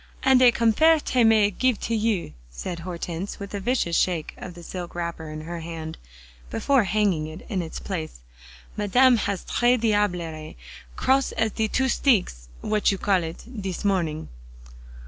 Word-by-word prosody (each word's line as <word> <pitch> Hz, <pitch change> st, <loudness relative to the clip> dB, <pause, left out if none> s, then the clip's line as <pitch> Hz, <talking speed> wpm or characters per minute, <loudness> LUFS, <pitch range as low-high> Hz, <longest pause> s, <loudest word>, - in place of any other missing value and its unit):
"And 265 Hz, -1 st, +5 dB
a 250 Hz, -1 st, +8 dB
comfairte 250 Hz, +3 st, +3 dB
may 220 Hz, -2 st, +5 dB
it 200 Hz, -, -15 dB
gif 255 Hz, -4 st, +2 dB
to 230 Hz, -, -1 dB
you," 215 Hz, -4 st, -1 dB, 0.2 s
said -, -, -6 dB
Hortense, 175 Hz, +1 st, -5 dB
with 200 Hz, 0 st, -8 dB
a 200 Hz, -, -2 dB
vicious 200 Hz, -5 st, 0 dB
shake 170 Hz, -4 st, 0 dB
of 180 Hz, -2 st, -9 dB
the 175 Hz, -, -11 dB
silk 175 Hz, 0 st, -7 dB
wrapper 170 Hz, -2 st, -4 dB
in 155 Hz, 0 st, -6 dB
her 170 Hz, +2 st, -6 dB
hand, 160 Hz, -1 st, -7 dB, 0.5 s
before 265 Hz, -, +2 dB
hanging 195 Hz, -7 st, +1 dB
it 155 Hz, +3 st, -10 dB
in 195 Hz, -5 st, -1 dB
its 160 Hz, -2 st, -6 dB
place. 160 Hz, -, -5 dB, 0.5 s
"Madame 245 Hz, +5 st, +4 dB
has 200 Hz, -3 st, -2 dB
the -, -, -11 dB
tres 245 Hz, +1 st, +3 dB
diablerie, 180 Hz, -8 st, -1 dB, 0.4 s
cross 270 Hz, 0 st, +2 dB
as 220 Hz, -1 st, 0 dB
de 220 Hz, +1 st, 0 dB
two 265 Hz, +4 st, +1 dB
steeks, 190 Hz, -, +1 dB
what 210 Hz, -1 st, +1 dB
you 195 Hz, -, -2 dB
call 190 Hz, -2 st, +1 dB
it, 165 Hz, 0 st, -7 dB, 0.2 s
dis 190 Hz, 0 st, -4 dB
morning." 170 Hz, -6 st, 0 dB
195 Hz, 170 wpm, -24 LUFS, 170-225 Hz, 0.5 s, a